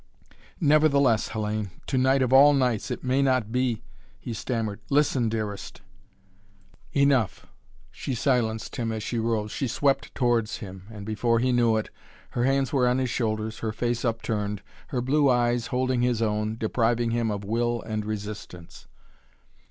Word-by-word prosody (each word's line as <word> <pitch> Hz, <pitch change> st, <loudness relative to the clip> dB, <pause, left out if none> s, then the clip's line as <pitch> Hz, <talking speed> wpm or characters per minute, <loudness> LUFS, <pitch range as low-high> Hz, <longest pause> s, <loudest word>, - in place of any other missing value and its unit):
"Nevertheless, 140 Hz, -, +4 dB
Hellayne, 105 Hz, -1 st, -2 dB, 0.2 s
to -, -, -2 dB
night 130 Hz, +1 st, +3 dB
of 130 Hz, 0 st, 0 dB
all 145 Hz, +2 st, +8 dB
nights 125 Hz, -6 st, +1 dB
it -, -, -4 dB
may 130 Hz, +2 st, +2 dB
not 130 Hz, -5 st, +1 dB
be 125 Hz, -2 st, 0 dB, 0.2 s
" -, -, -31 dB
he 115 Hz, -, -6 dB
stammered. 110 Hz, -2 st, -3 dB
"Listen, 135 Hz, -5 st, +2 dB
dearest 110 Hz, -2 st, -5 dB, 0.6 s
" 100 Hz, -2 st, -31 dB
"Enough!" 130 Hz, -8 st, +2 dB, 0.5 s
she 135 Hz, -, -4 dB
silenced 115 Hz, -4 st, 0 dB
him, 115 Hz, -2 st, -1 dB
as 110 Hz, -1 st, -4 dB
she 115 Hz, +2 st, -2 dB
rose. 110 Hz, -2 st, -1 dB
She 135 Hz, -, -2 dB
swept 140 Hz, +4 st, 0 dB
towards 120 Hz, -4 st, +1 dB
him 95 Hz, -2 st, -10 dB
and, 105 Hz, -3 st, -9 dB
before 115 Hz, +2 st, +1 dB
he 125 Hz, +2 st, +1 dB
knew 120 Hz, -2 st, +3 dB
it, 110 Hz, -, -4 dB, 0.4 s
her 120 Hz, -, 0 dB
hands 135 Hz, 0 st, +1 dB
were 130 Hz, -3 st, +3 dB
on 125 Hz, +1 st, +2 dB
his 130 Hz, -2 st, -1 dB
shoulders, 110 Hz, -2 st, -2 dB
her 110 Hz, -, -2 dB
face 120 Hz, +1 st, -2 dB
upturned, 105 Hz, -3 st, -2 dB, 0.2 s
her 125 Hz, -, -2 dB
blue 140 Hz, +3 st, +3 dB
eyes 120 Hz, -1 st, +2 dB
holding 130 Hz, -1 st, 0 dB
his 120 Hz, -2 st, +1 dB
own, 105 Hz, 0 st, -1 dB
depriving 115 Hz, +1 st, +1 dB
him 115 Hz, -1 st, 0 dB
of 100 Hz, -1 st, -3 dB
will 120 Hz, +2 st, -1 dB
and 110 Hz, -1 st, -3 dB
resistance. 105 Hz, -5 st, -7 dB
115 Hz, 165 wpm, -26 LUFS, 110-130 Hz, 0.6 s, all